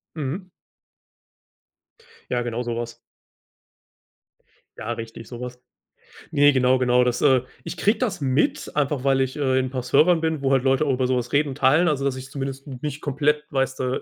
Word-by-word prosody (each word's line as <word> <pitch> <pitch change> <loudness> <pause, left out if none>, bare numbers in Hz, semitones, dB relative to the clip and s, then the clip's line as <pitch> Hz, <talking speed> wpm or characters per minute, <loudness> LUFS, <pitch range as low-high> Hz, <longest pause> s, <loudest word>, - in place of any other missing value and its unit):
Mhm. 160 +6 -4 1.8
Ja, 120 -1 0
genau 120 0 -3
so 120 -1 -3
was. 120 0 -5 1.8
Ja, 115 +2 -3
richtig 115 0 -8
so 120 - -8
was. 125 0 -7 0.7
Ne 145 -1 +5
genau 130 0 +3
genau 125 -1 +3
das 125 -1 0
äh, 130 -3 +5 0.2
ich - - -5
kriege 205 +6 +2
das 215 -10 -2
mit, 135 +2 0
einfach 145 -2 0
weil 135 -1 +3
ich, 130 -1 0
äh, 130 -3 +1
in 130 - 0
'n - - -4
paar 130 -1 -4
Servern 160 +7 +4
bin, 160 -2 -1
wo 135 -1 +1
halt 135 -2 +3
Leute 135 +2 +2
auch 140 - +1
über 130 0 0
so 130 0 +1
was 120 0 -4
reden 145 +1 +3
und 130 - -6
teilen, 155 +7 +4
also, 140 -2 -1
dass 135 -2 0
ich 130 +1 -8
zumindest 135 0 -5
m 130 -3 -8
nicht 150 -1 -4
komplett, 150 +1 0
weißt 135 -1 -1
du, 130 0 -1
135 Hz, 195 wpm, -23 LUFS, 125-145 Hz, 1.8 s, Ne